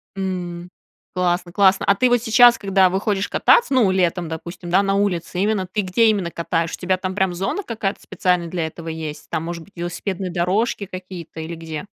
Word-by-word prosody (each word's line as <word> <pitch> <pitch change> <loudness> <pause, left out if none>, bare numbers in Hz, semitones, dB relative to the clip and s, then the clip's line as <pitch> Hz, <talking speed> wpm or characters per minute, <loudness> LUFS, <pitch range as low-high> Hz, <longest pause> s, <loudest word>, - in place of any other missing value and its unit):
М, 180 -2 -4 0.4
классно 175 -1 0
классно! 190 0 +3
А 200 - +4
ты 250 +5 +3
вот 245 -1 +3
сейчас, 240 +1 +6
когда 195 -2 +3
выходишь 195 +1 -1
кататься, 475 - +4
ну, 245 -7 +4
летом, 180 -2 0
допустим, 170 +2 -7
да, 190 +3 +4
на 195 0 +1
улице, 180 -3 -1
именно 200 -1 +1
ты, 210 - 0
где 190 +4 +2
именно 200 -5 0
катаешь? 165 0 -1
У - - -4
тебя 185 0 0
там 185 0 -4
прям 190 -3 +1
зона 195 - -2
какая-то 220 - -3
специальная 180 -2 0
для 165 -1 -2
этого 165 +1 -10
есть? 160 -2 -6
Там, 160 - -2
может 170 0 -5
быть, 200 - -22
велосипедные 180 +2 -4
дорожки 190 +5 0
какие-то 185 -3 -9
или 160 +1 -5
где? 160 +1 -6
185 Hz, 195 wpm, -21 LUFS, 170-200 Hz, 0.4 s, сейчас